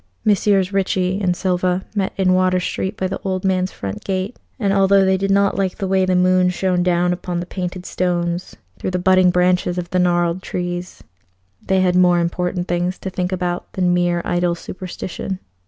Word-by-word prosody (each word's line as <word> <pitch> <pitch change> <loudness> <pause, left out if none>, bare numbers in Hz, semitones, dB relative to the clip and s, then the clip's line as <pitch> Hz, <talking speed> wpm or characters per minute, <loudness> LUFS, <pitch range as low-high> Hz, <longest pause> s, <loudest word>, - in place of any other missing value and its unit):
Messrs. 200 -2 +2
Ricci 190 -1 0
and 180 -2 +1
Silva 180 0 0
met 195 -2 -1
in 185 -1 +3
Water 185 0 +3
Street 190 +2 -3
by 190 - -2
the 185 - -3
old 190 -1 -2
man's 185 -1 +1
front 95 -1 -6
gate, 190 +4 -2 0.2
and 200 -4 +1
although 195 0 +4
they 190 0 +3
did 195 +1 -1
not 200 0 +2
like 190 -2 -1
the 195 - -2
way 190 0 +2
the 185 - +2
moon 180 0 +4
shone 180 0 0
down 175 0 +2
upon 175 0 -4
the 175 - -4
painted 180 0 -5
stones 175 -1 -2 0.2
through - - -2
the 180 - -1
budding 185 0 +4
branches 180 0 +2
of 175 0 -4
the 185 - +1
gnarled 175 0 +1
trees, 175 -1 -5 0.6
they 190 0 +1
had 180 -1 +2
more 180 -1 +5
important 180 +1 -1
things 175 +1 -1
to 190 - -6
think 180 0 -2
about 180 -1 -3
than 180 -2 +1
mere 175 -1 +1
idle 175 0 +1
superstition. 185 +1 -6
185 Hz, 190 wpm, -20 LUFS, 180-190 Hz, 0.6 s, more